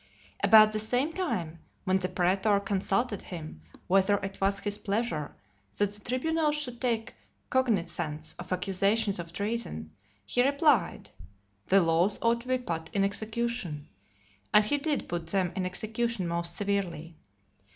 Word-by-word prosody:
About 215 -1 +8
the 215 - -2
same 250 +8 0
time, 175 - -2 0.2
when 185 0 +2
the 185 -1 -2
praetor 195 +3 +2
consulted 200 +2 -1
him, 155 - -8 0.2
whether 195 +2 +3
it 195 0 -6
was 195 +1 +2
his 205 0 -3
pleasure 205 -7 -2 0.4
that 205 0 +1
the 205 - -12
tribunals 300 +6 0
should 250 -5 -4
take 230 -3 -1 0.4
cognizance 175 - 0
of 180 +1 -9
accusations 195 +2 +1
of 170 -1 -6
treason, 200 - -3 0.3
he 245 - +2
replied, 280 - +2 0.6
"The 195 +1 +5
laws 170 +5 +2
ought 235 0 +2
to 250 - -14
be 255 0 +2
put 165 -10 -4
in 200 - +2
execution;" 220 -6 -2 0.6
and 210 0 +6
he 290 +7 +2
did 295 0 -1
put 170 -1 -4
them 185 0 0
in 185 -1 -1
execution 220 +1 -2
most 170 0 -2
severely. 185 -5 -2
200 Hz, 145 wpm, -29 LUFS, 175-235 Hz, 0.6 s, About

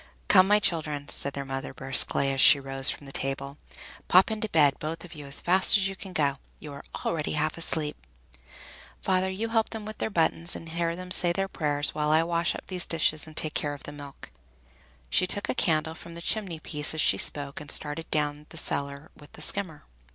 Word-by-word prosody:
"Come, 185 -1 +6
my 210 +1 +5
children," 150 -6 -1
said 140 - +1
their 140 0 -5
mother 135 0 -6
briskly, 135 +1 0
as 135 0 0
she 145 - +8
rose 135 0 +7
from 145 - -4
the 135 - -10
table, 140 +1 -4 0.5
"pop 185 +4 +5
into 220 0 -3
bed, 145 -6 +3
both 165 +3 -5
of 175 - -13
you, 145 -3 -10
as 140 - -1
fast 190 +4 +4
as 195 -1 +1
you 195 - -5
can 190 0 -10
go. 140 -5 0 0.2
You 150 -2 -9
are 140 - -10 0.2
already 155 -2 -2
half 155 +1 -1
asleep! 160 -3 -1 1.1
Father, 190 0 +1
you 210 +5 -4
help 225 -1 +1
them 220 -2 -7
with 215 0 -8
their - - -1
buttons, 165 -2 +1
and 165 - -9
hear 170 0 -2
them 180 +1 -9
say 180 -1 +4
their 195 +3 -2
prayers, 145 -5 0
while 150 0 -1
I 160 +1 +4
wash 170 0 -1
up - - -9
these 180 -2 -5
dishes 155 -1 +1
and 155 - -14
take 155 - -1
care 145 -1 -2
of 140 - -14
the - - -8
milk." 145 -1 -11 0.8
She 185 - +4
took 205 +2 +1
a - - +1
candle 160 -8 0
from 170 0 -12
the 170 - -9
chimney 190 -7 -1
piece 150 0 -4
as 155 - +2
she - - +4
spoke, 140 0 +1
and 150 - -11
started 150 +3 -2
down 150 0 -2
cellar 140 -1 -2
with 145 - -17
the - - -12
skimmer. 180 -6 -3
155 Hz, 215 wpm, -27 LUFS, 145-180 Hz, 1.1 s, she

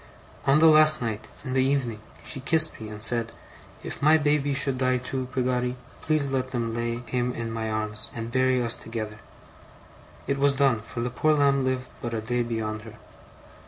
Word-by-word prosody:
'On 135 +2 +5
the 160 - +5
last 155 -1 +7
night, 110 -3 -4 0.2
in 130 - -3
the 130 0 +3
evening, 130 -5 -1 0.2
she 140 - -4
kissed 155 0 +2
me, 110 - -6
and 105 0 -6
said: 115 0 +2 0.5
"If - - -7
my 155 +2 +6
baby 145 -2 +1
should 135 -2 +1
die 130 -1 +2
too, 125 +1 -4
Peggotty, 125 -1 0 0.3
please 155 -3 0
let 130 -1 -1
them 120 -3 -2
lay 120 0 -2
him 125 0 -2
in 115 -1 -4
my 110 -1 -3
arms, 110 0 -3
and 115 0 -5
bury 130 0 +2
us 115 0 +4
together." 110 -2 -5 1.1
(It 140 0 -1
was 140 0 +4
done; 135 -5 +3
for 115 +2 -6
the 120 +1 -2
poor 155 +5 +2
lamb 140 -2 +3
lived 130 -1 -2
but 120 -1 -3
a - - -1
day 120 +3 -1
beyond 110 -2 -3
her.) 110 0 -12
125 Hz, 195 wpm, -26 LUFS, 115-140 Hz, 1.1 s, last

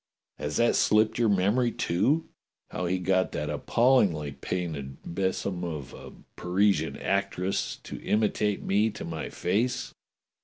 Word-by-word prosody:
Has 75 - -2
that 120 - +3
slipped 110 +2 +3
your 115 -2 +3
memory, 105 +6 +2
too? 120 - +1 0.4
How 90 - -2
he 95 +2 +1
got 95 0 +1
that 75 0 -2
appallingly 95 - +2
painted 70 -4 -4
besom 95 0 -2
of 75 -7 -5
a - - -10 0.2
Parisian 95 +3 +1
actress 100 -1 -1
to - - -8
imitate 105 -1 0
me 105 +3 +2
to - - -7
my 80 -2 -5
face? 120 +7 -1
95 Hz, 130 wpm, -27 LUFS, 85-110 Hz, 0.4 s, that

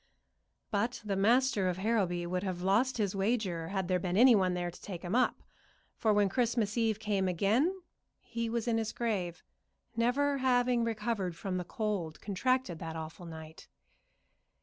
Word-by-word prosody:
But 230 +4 0
the 200 -2 -1
master 215 -1 +3
of 180 - -2
Harrowby 190 -4 0
would 180 +1 -2
have 185 -2 -3
lost 225 +8 +2
his 205 -3 0
wager 195 -5 0
had 190 0 -2
there 180 0 +1
been 180 0 -1
anyone 210 -7 +6
there 175 -1 -2
to - - -15
take 180 -3 -7
him 175 +2 -3
up, 250 +1 +2 0.5
for 220 - +1
when 205 -1 +4
Christmas 230 -1 0
Eve 225 -3 +1
came 205 -3 0
again 225 - +1 0.4
he 230 -1 -4
was 235 0 -2
in 225 -1 +2
his 220 0 -3
grave, 190 -7 -2 0.5
never 275 +5 +1
having 245 -2 +2
recovered 225 -5 -2
from 185 +1 -3
the 180 - -2
cold 190 -5 -3
contracted 210 -2 0
that 165 -1 -6
awful 160 +2 -7
night. 160 -1 -10
205 Hz, 165 wpm, -31 LUFS, 180-235 Hz, 0.5 s, anyone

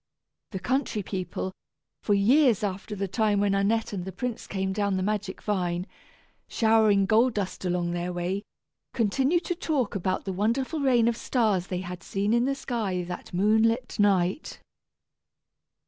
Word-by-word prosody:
The 195 - -5
country 245 -1 -1
people, 185 0 -4 0.5
for 205 - +2
years 235 +2 +4
after 200 +1 -3
the 200 0 -2
time 210 0 +1
when 200 -1 +2
Annette 210 +3 +1
and 185 -3 -3
the 190 - -6
prince 235 +5 -4
came 190 -1 -2
down 200 -1 0
the 185 - -1
magic 205 -1 -3
vine, 180 -3 -1 0.6
showering 220 -3 +3
gold 225 +4 +3
dust 190 -2 -3
along 175 -1 0
their 175 +1 -2
way, 180 +3 -2 0.5
continued 265 - +2
to - - 0
talk 295 - -1
about 185 -1 -2
the 190 - -3
wonderful 235 - 0
rain 250 -5 +3
of 235 - +2
stars 215 -7 0
they 180 -1 -3
had 180 -1 -7
seen 200 +5 -1
in 235 +1 +3
the 275 +1 0
sky 215 -9 -2
that 180 0 -7
moon 210 +5 +3
lit 230 +1 0
night. 195 - +1
205 Hz, 160 wpm, -27 LUFS, 185-230 Hz, 0.6 s, years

